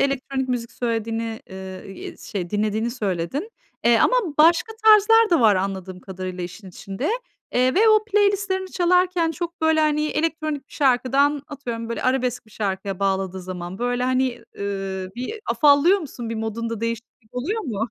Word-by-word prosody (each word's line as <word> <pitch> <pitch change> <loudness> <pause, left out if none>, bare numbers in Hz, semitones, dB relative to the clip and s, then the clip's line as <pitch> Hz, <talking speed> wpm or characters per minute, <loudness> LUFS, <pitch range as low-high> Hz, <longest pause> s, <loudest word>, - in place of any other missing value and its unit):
elektronik 270 -1 -1
müzik 235 -2 -2
söylediğini, 225 -1 -2
eee, 190 0 -8
eee, - - -8
şey 180 -4 -5
dinlediğini 215 +2 0
söyledin. 220 - -3 0.3
Eee, 235 -1 +5
ama - - +4 0.2
başka 335 +8 +5
tarzlar 440 +1 +7
da 340 - +4
var 215 -4 +5
anladığım 190 -1 -3
kadarıyla 185 -1 -6
işin 190 +3 -9
içinde. 195 - -5 0.4
Eee, 255 +1 +3
ve 445 +4 +5
o 430 0 +5
playlist'lerini 400 -3 +1
çalarken 360 -1 +2
çok 340 +1 -5
böyle, 320 0 +3
hani, 300 0 +2
elektronik 310 -2 -2
bir - - -22
şarkıdan, 275 +1 +2
atıyorum, 235 -6 -5
böyle 230 - -3
arabesk 250 -2 0
bir - - -20
şarkıya 195 -2 -3
bağladığı 190 -1 -1
zaman, 180 0 -6
böyle, 245 +1 -1
hani, 255 -1 0 0.2
ııı, 195 -2 -3
bir 250 - -4 0.2
afallıyor 300 +6 +5
musun, 250 -8 -7
bir 230 - -2
modunda 225 0 -3
değişiklik 230 0 -6
oluyor 360 - -2
mu? 225 -4 -2
245 Hz, 160 wpm, -23 LUFS, 200-310 Hz, 0.4 s, tarzlar